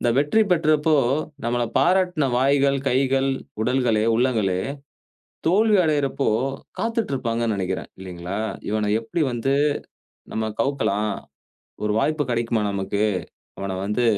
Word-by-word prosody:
இந்த 120 Hz, -, +2 dB
வெற்றி 150 Hz, +10 st, +3 dB
பெற்றப்போ, 155 Hz, -1 st, +3 dB, 0.5 s
நம்மள 120 Hz, 0 st, +1 dB
பாராட்டுன 180 Hz, -4 st, +2 dB
வாய்கள், 140 Hz, +1 st, +3 dB
கைகள், 135 Hz, +1 st, +2 dB, 0.3 s
உடல்களே, 120 Hz, -3 st, +2 dB
உள்ளங்களே 110 Hz, -7 st, +1 dB, 0.9 s
தோல்வி 210 Hz, +4 st, +4 dB
அடையிறப்போ 145 Hz, -3 st, 0 dB, 0.5 s
காத்துட்டு 225 Hz, -7 st, -1 dB
இருப்பாங்கன்னு 115 Hz, -4 st, -1 dB
நினைக்கிறேன். 95 Hz, -2 st, -3 dB
இல்லேங்களா! 90 Hz, +1 st, -6 dB, 0.3 s
இவன 105 Hz, -1 st, 0 dB
எப்படி 135 Hz, +8 st, -3 dB
வந்து 120 Hz, +3 st, 0 dB, 0.8 s
நம்ம 110 Hz, 0 st, -1 dB
கவுக்கலாம், 105 Hz, -7 st, 0 dB, 0.7 s
ஒரு 105 Hz, -, +1 dB
வாய்ப்பு 150 Hz, +4 st, +1 dB
கிடைக்குமா 115 Hz, -2 st, 0 dB
நமக்கு? 100 Hz, +1 st, -1 dB, 0.6 s
அவன 95 Hz, -1 st, -3 dB
வந்து 105 Hz, +4 st, 0 dB
125 Hz, 110 wpm, -23 LUFS, 110-145 Hz, 0.9 s, தோல்வி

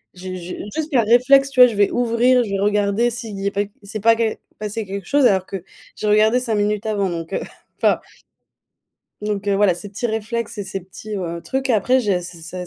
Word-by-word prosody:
j'ai 185 Hz, 0 st, -7 dB
j'ai, 180 Hz, 0 st, -7 dB, 0.2 s
juste 315 Hz, 0 st, -3 dB
par 240 Hz, -5 st, +3 dB
réflexe, 270 Hz, +4 st, +5 dB
tu 265 Hz, -, -3 dB
vois, 250 Hz, -, +11 dB
je 230 Hz, -, -4 dB
vais 205 Hz, 0 st, +3 dB
ouvrir, 245 Hz, +1 st, +3 dB
je 210 Hz, -, -6 dB
vais 195 Hz, -, -1 dB
regarder 210 Hz, +3 st, +1 dB
si 225 Hz, -1 st, -6 dB
il 200 Hz, -, -7 dB
y 195 Hz, -, -2 dB
a -, -, 0 dB
pas 200 Hz, -, 0 dB, 0.2 s
s'est 215 Hz, +2 st, -6 dB
pas 230 Hz, +2 st, +5 dB
que 225 Hz, -1 st, 0 dB, 0.2 s
passé 215 Hz, +1 st, -4 dB
quelque 195 Hz, -1 st, -6 dB
chose 285 Hz, -2 st, +3 dB
alors 190 Hz, -2 st, +2 dB
que 190 Hz, -3 st, -6 dB, 0.3 s
j'ai 215 Hz, -, -3 dB
regardé 215 Hz, +3 st, +4 dB
5 235 Hz, -4 st, -1 dB
minutes 210 Hz, +1 st, 0 dB
avant 200 Hz, -3 st, 0 dB
donc, 165 Hz, +1 st, -5 dB
heu, -, -, -1 dB, 0.4 s
enfin. -, -, +2 dB, 1.2 s
Donc, 205 Hz, -1 st, -3 dB
heu, 200 Hz, -, +2 dB
voilà 200 Hz, -2 st, +4 dB
ces 190 Hz, +4 st, -9 dB
petits 205 Hz, +4 st, -3 dB
réflexes 225 Hz, +1 st, -3 dB
et 205 Hz, -, -3 dB
ces 190 Hz, 0 st, -5 dB
petits, 190 Hz, +4 st, -9 dB
heu, 170 Hz, -2 st, -4 dB
trucs 265 Hz, 0 st, -2 dB
après 250 Hz, +3 st, +3 dB
j'ai 200 Hz, -6 st, 0 dB
c'est 175 Hz, -1 st, -9 dB
c'est 180 Hz, +2 st, -7 dB
210 Hz, 230 wpm, -20 LUFS, 195-235 Hz, 1.2 s, vois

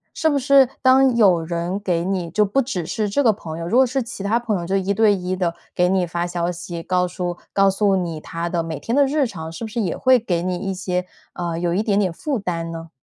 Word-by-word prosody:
是 320 Hz, -, +2 dB
不 285 Hz, -2 st, +1 dB
是 270 Hz, 0 st, +5 dB
当 260 Hz, -1 st, +5 dB
有 190 Hz, -7 st, +4 dB
人 170 Hz, +3 st, -3 dB
给 175 Hz, -4 st, -1 dB
你 185 Hz, -3 st, -2 dB
就 210 Hz, +6 st, +2 dB
不 270 Hz, +7 st, +1 dB
只 190 Hz, -10 st, -3 dB
是 215 Hz, +5 st, -2 dB
这 285 Hz, +8 st, +1 dB
个 230 Hz, -, +5 dB
朋 165 Hz, -6 st, -7 dB
友， 165 Hz, -, -4 dB
如 230 Hz, +8 st, +2 dB
果 265 Hz, -, +6 dB
是 260 Hz, +2 st, -1 dB
其 230 Hz, -4 st, -8 dB
他 220 Hz, +4 st, +1 dB
朋 215 Hz, -6 st, -1 dB
友 170 Hz, -, -5 dB
就 190 Hz, +2 st, -1 dB
一 195 Hz, +1 st, 0 dB
对 215 Hz, 0 st, +4 dB
一 185 Hz, 0 st, -3 dB
地 175 Hz, -2 st, -1 dB, 0.2 s
给 180 Hz, -, +3 dB
你 185 Hz, -1 st, +2 dB
发 170 Hz, +1 st, -2 dB
消 175 Hz, 0 st, -2 dB
息， 175 Hz, -1 st, -6 dB
告 180 Hz, -1 st, +1 dB
诉 175 Hz, -1 st, -4 dB, 0.2 s
告 195 Hz, 0 st, +4 dB
诉 195 Hz, 0 st, +2 dB
你 170 Hz, -4 st, -2 dB
他 165 Hz, +2 st, -5 dB
的 170 Hz, -1 st, -1 dB
每 160 Hz, -3 st, -5 dB
天 230 Hz, -, -2 dB
的 285 Hz, -, +5 dB
日 285 Hz, 0 st, +1 dB
常， 160 Hz, -5 st, -7 dB
是 195 Hz, -, -7 dB
不 -, -, -3 dB
是 235 Hz, -, -4 dB
也 185 Hz, -5 st, -1 dB
会 255 Hz, -1 st, +4 dB
给 175 Hz, -6 st, -1 dB
你 180 Hz, -1 st, -1 dB
一 195 Hz, +1 st, -3 dB
些 180 Hz, -1 st, -2 dB, 0.3 s
呃， 170 Hz, -2 st, -3 dB
有 175 Hz, -1 st, 0 dB
一 205 Hz, +5 st, +1 dB
点 205 Hz, -2 st, +1 dB
点 190 Hz, -4 st, +1 dB
负 265 Hz, -, -3 dB
担 165 Hz, -3 st, -3 dB
呢？ 165 Hz, 0 st, -8 dB
185 Hz, 285 characters per minute, -21 LUFS, 170-220 Hz, 0.3 s, 果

